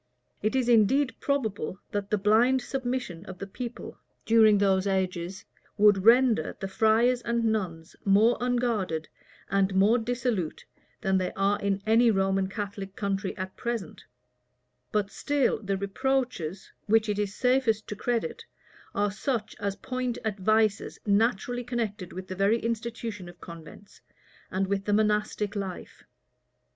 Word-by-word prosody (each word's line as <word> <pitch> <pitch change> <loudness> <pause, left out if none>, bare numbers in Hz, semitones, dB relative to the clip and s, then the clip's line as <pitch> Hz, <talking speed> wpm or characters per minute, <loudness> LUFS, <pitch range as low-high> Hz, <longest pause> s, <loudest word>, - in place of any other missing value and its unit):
It 215 +5 0
is 255 -2 +1
indeed 245 +4 +4
probable, 220 - -2
that 205 -1 -3
the 210 - +2
blind 230 +6 +3
submission 245 -10 -3
of 185 - -8
the 195 - -5
people, 240 +4 -7 0.3
during 220 -2 +6
those 195 -1 +2
ages, 185 -1 -2 0.3
would 205 -2 +5
render 235 -8 +4
the 195 - -3
friars 225 +5 +3
and 235 0 -1
nuns 180 -7 -2
more 210 +4 +4
unguarded 230 -10 0 0.4
and 195 -1 +2
more 210 +6 +4
dissolute 230 -7 -2 0.4
than 190 -2 +2
they 185 - -2
are 200 +1 +1
in 200 0 -1
any 230 +2 +5
Roman 195 -2 +1
Catholic 200 -2 -6
country 200 -1 -2
at 185 0 -5
present; 235 -4 -4 0.9
but 205 -2 0
still 285 -5 0
the 195 -2 -1
reproaches, 200 - -2 0.2
which 220 +1 +3
it 205 -1 -1
is 205 -1 -2
safest 250 -4 +2
to 210 - -5
credit, 235 +3 -2 0.5
are 205 0 +1
such 220 +1 -3
as 200 -1 -2
point 255 0 -3
at 210 -2 -2
vices 215 +1 +1
naturally 225 +3 +1
connected 225 -6 -3
with 185 +1 -7
the 185 - -5
very 200 +4 +3
institution 230 -4 -4
of 175 - -15
convents, 170 +3 -12 0.5
and 190 +1 0
with 195 0 -2
the 205 - +1
monastic 210 0 +1
life. 195 -3 -6
210 Hz, 145 wpm, -27 LUFS, 195-235 Hz, 0.9 s, during